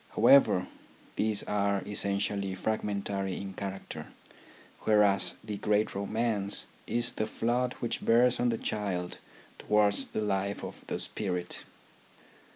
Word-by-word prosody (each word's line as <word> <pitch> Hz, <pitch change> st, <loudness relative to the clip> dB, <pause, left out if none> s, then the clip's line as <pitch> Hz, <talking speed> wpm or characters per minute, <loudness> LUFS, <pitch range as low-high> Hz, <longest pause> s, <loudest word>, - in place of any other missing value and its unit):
However, 135 Hz, -9 st, +6 dB, 0.5 s
these 105 Hz, -1 st, +1 dB
are 100 Hz, -1 st, 0 dB
essentially 100 Hz, -1 st, -1 dB
fragmentary 100 Hz, -2 st, -2 dB
in 95 Hz, -1 st, -6 dB
character, 95 Hz, 0 st, -6 dB, 0.7 s
whereas 105 Hz, -2 st, +3 dB
the 105 Hz, -1 st, -5 dB
great 105 Hz, +1 st, +1 dB
romance 100 Hz, 0 st, -1 dB, 0.2 s
is 120 Hz, 0 st, +1 dB
the 110 Hz, -, -2 dB
flood 120 Hz, +3 st, 0 dB
which 120 Hz, -, -2 dB
bears 120 Hz, +2 st, +4 dB
on 120 Hz, -, +2 dB
the 115 Hz, -, 0 dB
child 95 Hz, -6 st, -3 dB, 0.4 s
towards 105 Hz, -1 st, +3 dB
the -, -, -3 dB
life 100 Hz, -1 st, -1 dB
of -, -, -8 dB
the -, -, -2 dB
spirit. 90 Hz, -4 st, -3 dB
105 Hz, 120 wpm, -30 LUFS, 100-110 Hz, 0.7 s, However